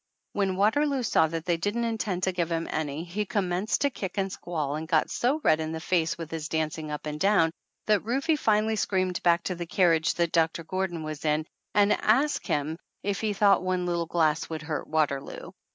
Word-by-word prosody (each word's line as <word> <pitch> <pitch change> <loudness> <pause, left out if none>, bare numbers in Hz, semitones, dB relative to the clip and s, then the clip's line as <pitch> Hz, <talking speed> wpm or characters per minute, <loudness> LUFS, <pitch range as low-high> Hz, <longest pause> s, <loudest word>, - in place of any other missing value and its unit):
When 195 -2 0
Waterloo 270 +7 +2
saw 160 -7 +3
that 165 0 -5
they 175 -2 +1
didn't 205 +7 -1
intend 220 -5 -2
to 190 - +2
give 175 -2 -2
him 165 0 -1
any 155 0 -2
he 180 +5 -3
com 195 -1 -1
menced 190 +5 0
to 285 - +2
kick 190 -5 -6
and 195 -1 0
squall 155 -6 -3
and 160 +1 -5
get 160 -2 +2
so 265 +6 +1
red 155 - +4
in 160 0 -3
the 160 - -3
face 165 -1 0
with 165 -2 -7
his 160 -1 -4
dancing 155 -1 -2
up 150 0 -5
and 150 0 -4
down 195 -4 +4 0.3
that 210 -3 +2
Rufe 275 +8 0
finally 220 -1 +2
screamed 185 -3 0
back 170 -1 +3
to 185 - -2
the 175 -1 -6
carriage 165 -3 +3
that 170 -1 +1
Doc 165 -1 +3
tor 170 - -6
Gordon 185 -2 -2
was 155 -1 -6
in 155 0 +1 0.3
and 205 0 +5
asked 270 +8 +2
him 150 +2 -1 0.3
if 200 0 -1
he 215 -2 0
thought 200 0 +4
one 185 -1 -1
little 170 -1 -1
glass 160 -2 +1
would 160 -2 -5
hurt 150 -3 -4
Waterloo. 145 -3 -1
175 Hz, 215 wpm, -27 LUFS, 160-205 Hz, 0.3 s, and